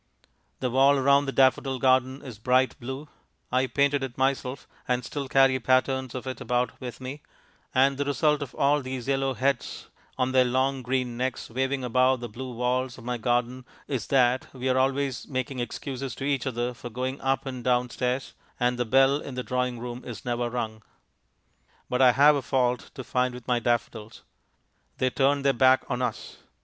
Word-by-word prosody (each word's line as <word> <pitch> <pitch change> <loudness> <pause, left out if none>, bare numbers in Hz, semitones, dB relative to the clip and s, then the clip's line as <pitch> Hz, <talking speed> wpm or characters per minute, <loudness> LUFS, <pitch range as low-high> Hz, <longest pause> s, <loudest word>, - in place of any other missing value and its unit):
The 125 -2 -1
wall 135 +2 +5
round 140 +1 +4
the - - 0
daffodil 135 0 +3
garden 130 +1 +2
is 120 -6 -9
bright 130 +3 +2
blue 130 +5 -6 0.4
I 130 +1 +2
painted 140 +1 +2
it 130 -2 -5
myself, 135 0 -1 0.2
and 125 -1 0
still 140 +1 -4
carry 135 -1 +4
patterns 130 0 +1
of 130 - -5
it 130 -1 -5
about 125 0 -1
with 125 -2 -7
me 130 +3 -7 0.5
and 135 +1 +3
the 145 - 0
result 150 +1 +1
of 140 -3 -6
all 145 +1 +2
these 130 -2 -6
yellow 135 -1 0
heads 135 0 -2 0.3
on 130 0 +1
their 130 -1 +5
long 130 +2 0
green 125 -1 -2
necks 130 -1 -3
waving 130 +2 -1
above 130 +1 +3
the 120 - -5
blue 125 +4 -7
walls 125 +1 -1
of 115 - -12
my 125 0 -3
garden 120 +2 0 0.2
is 130 -6 -3
that 130 -1 +2
we 130 0 -3
are 130 - +2
always 135 -1 0
making 130 0 -3
excuses 130 +1 -5
to - - -7
each 140 -1 0
other 120 -1 -2
for 120 +1 -9
going 130 +3 -4
up 135 0 0
and 130 -2 -5
down 125 0 +1
stairs, 125 +1 -2 0.3
and 125 0 +1
the 125 - +1
bell 135 +4 +4
in 140 -3 -7
the 125 - -3
drawing 125 -1 -1
room 120 +1 -6
is 120 - -8
never 120 0 -1
rung. 110 -3 -4 1.1
But 125 +1 +1
I 125 -2 +7
have 145 +3 +6
a 140 - -1
fault 125 -1 0
to 130 - -6
find 125 0 0
with 125 -1 -11
my 125 -1 +2
daffodils. 115 -2 -2 0.7
They 130 0 +1
turn 140 +2 +2
their 140 -1 +3
backs 130 +1 +4
on 125 - -1
us. 125 - -4
130 Hz, 190 wpm, -26 LUFS, 125-135 Hz, 1.1 s, I